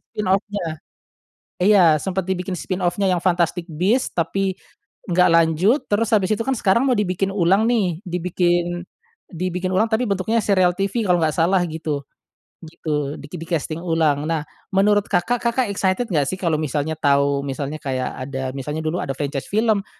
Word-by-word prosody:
spin 210 - -4
off-nya. 190 -4 -1 0.8
Iya, 180 -6 +5
sempet 190 +1 -2
dibikin 185 0 -3
spin 185 +1 -4
off-nya 185 +2 +1
yang 180 - +1
Fantastic 175 0 0
Beast 190 +11 0
tapi, 190 +2 0 0.6
nggak 180 0 +4
lanjut, 165 - +3
terus 220 +1 +2
habis 200 0 +1
itu, 215 - +1
kan, 265 - +1
sekarang 230 +6 +2
mau 255 - +3
dibikin 195 -2 0
ulang, 195 +3 +3
nih. 190 -9 +1
Dibikin, 175 0 0 0.4
dibikin 185 +1 -3
ulang 220 +4 +2
tapi 230 +2 +1
bentuknya 200 +3 0
serial 185 -4 +2
TV 195 +4 -1
kalau 180 -1 +4
nggak 160 -2 +1
salah 175 +3 +2
gitu, 155 -3 -4 0.6
gitu 150 -3 -3
di 145 - -11
di-casting 165 -2 -3
ulang. 160 -4 +1
Nah, 160 -1 0 0.3
menurut 205 +1 +3
Kakak, 200 +6 +1
Kakak 235 0 +1
excited 200 +3 0
nggak, 150 -5 +1
sih, 165 - -3
kalau 165 -3 +1
misalnya 150 +1 -2
tahu, 140 -1 +2
misalnya 140 +2 -4
kayak 130 -3 -3 0.2
ada 130 -1 -4
misalnya 150 +4 -4
dulu 155 +3 -2
ada 135 - -3
franchise 140 0 -3
film 215 -1 +1
180 Hz, 165 wpm, -21 LUFS, 155-195 Hz, 0.8 s, Iya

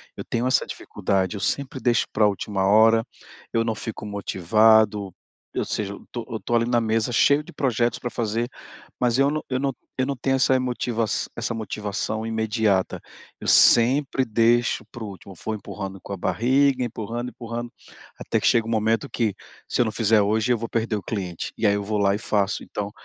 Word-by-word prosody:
Eu - - -6
tenho 120 +1 -1
essa 130 - +2
dificuldade, 95 0 -2
eu - - -5
sempre 135 +4 -2
deixo 120 -2 +2
para 105 -1 +4
última 100 -1 -1
hora, 110 +2 +5 0.5
eu 115 0 +2
não 110 -1 -1
fico 110 -1 -6
motivado. 105 +1 +3 0.4
Ou - - 0
seja, 100 -1 -3
eu - - -11
estou, 120 -2 -7
eu 110 - -3
estou 120 - -2
ali 115 0 +3
na 120 -1 +3
mesa 115 +1 0
cheio 145 +5 +4
de - - -13
projetos 120 -4 0
para 120 - -4
fazer, 115 +1 -1 0.5
mas 125 0 +2
eu 140 +1 +3
não 155 - -2
eu 130 0 0
não 135 -1 -1 0.2
eu 130 - +1
não 140 0 -2
tenho 135 +2 0
essa 130 0 +3
motiva 120 -2 -1 0.3
essa 115 0 -2
motivação 110 0 -3
imediata, 110 -3 0 0.4
eu - - -6
sempre 130 +3 +5
deixo 115 0 +2
para 120 - -8
o - - -5
último, 95 -1 -11
for 110 +5 -4
empurrando 95 -2 -7
com 100 - -7
a - - -4
barriga, 130 +6 +2
empurrando, 120 +1 -4
empurrando, 120 0 -6 0.5
até - - -1
que - - -4
chega 115 -1 +3
um - - -4
momento 115 +4 +1
que, 110 -4 0 0.3
se - - +1
eu - - +3
não 110 - -1
fizer 110 -1 +3
hoje, 110 +4 +1
eu - - 0
vou 115 - -4
perder 115 -2 -1
o - - -5
cliente, 90 -6 -4
e - - -1
aí 100 - +5
eu 100 - -2
vou 105 +1 -2
lá 100 -1 +3
e - - -4
faço, 105 -2 0
então. 105 0 -5
115 Hz, 205 wpm, -24 LUFS, 105-120 Hz, 0.5 s, hora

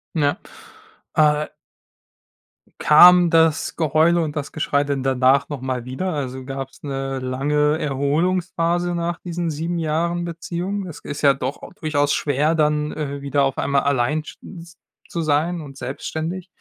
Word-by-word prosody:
N 155 - +1 0.7
ja, 150 -1 +1
äh - - -9 1.3
Kam 175 +3 +7
das 160 -1 +2
Geheule 160 +2 +3
und 155 -2 -3
das 145 -2 -4
Geschrei 145 -2 0
denn 140 -2 -2
danach 135 +1 +3
nochmal 130 -3 -4
wieder? 180 +9 -3
Also, 130 -3 -4
gab's 135 0 -7
'ne 135 -1 -3
lange 145 +4 0
Erholungsphase 170 +4 0
nach 170 0 -2
diesen 170 -1 -3
7 165 +3 -3
Jahren 170 +2 -1
Beziehung? 175 +3 -4
Es 165 - -9
ist 145 +1 -7
ja 140 -2 +5
doch 135 +1 -5 0.2
durchaus 145 -4 +1
schwer, 150 +3 +1
dann, 150 -1 +1
äh, 140 -2 -5
wieder 140 0 +1
auf 135 -1 0
einmal 140 0 +1
allein 140 +3 +1
sch - - -11 0.2
z 170 0 -15 0.3
zu 170 - -3
sein 160 +3 0
und 135 -2 -11
selbstständig. 160 +8 -5
150 Hz, 150 wpm, -21 LUFS, 140-170 Hz, 1.3 s, Kam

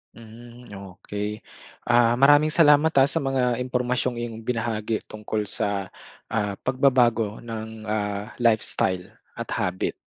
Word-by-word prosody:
Hmm, 120 +2 -13
okey. 100 +2 -6 0.4
Ah, 120 -1 +4
maraming 145 +4 +5
salamat 155 -1 +5
ah, 135 0 +6
sa 165 - -1
mga 130 -4 0
impormasyong 125 0 -1
iyong 115 -2 -5
binahagi 115 -2 -2
tungkol 105 0 -4
sa, 100 -2 -3 0.4
ah, 105 -3 -1
pagbabago 120 -5 +2
ng, 110 -1 -7
ah, 105 -1 -3
lifestyle 110 -5 +1 0.3
at - - -6
habit. 90 0 -2
115 Hz, 120 wpm, -24 LUFS, 105-125 Hz, 0.4 s, ah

